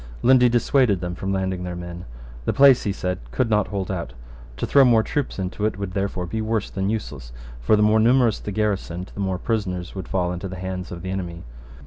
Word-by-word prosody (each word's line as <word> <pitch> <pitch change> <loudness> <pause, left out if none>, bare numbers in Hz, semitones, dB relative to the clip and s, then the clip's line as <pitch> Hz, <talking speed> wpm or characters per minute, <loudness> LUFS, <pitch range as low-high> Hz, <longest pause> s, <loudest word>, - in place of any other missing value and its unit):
Lundy 125 -1 +6
dissuaded 120 -3 +2
them 90 0 -4
from 95 +2 -4
landing 95 -1 -1
their 90 -1 -4
men. 85 0 -7 0.4
The - - +1
place, 140 -2 +6
he 100 - +1
said, 90 -2 -3
could 115 - -1
not 105 -2 +2
hold 95 -1 -3
out. 85 -9 -4 0.4
To - - -2
throw 140 - +5
more 115 -3 +5
troops 145 +2 -2
into 95 +2 -4
it 110 - -4
would 100 -2 -4
therefore 95 -2 -2
be 110 +6 -3
worse 110 -1 -1
than 95 0 -1
useless: 70 - -4 0.3
for - - +3
the 105 - +3
more 105 +1 +4
numerous 120 -1 +4
the 105 - -6
garrison, 95 -4 -2
the - - -9
more 95 -2 -1
prisoners 90 -5 -2
would 95 -4 -6
fall 90 -2 -1
into 90 +2 -5
the 95 - -7
hands 90 0 -5
of 85 0 -7
the 95 - -4
enemy. 85 -3 -5
95 Hz, 225 wpm, -23 LUFS, 90-110 Hz, 0.4 s, Lundy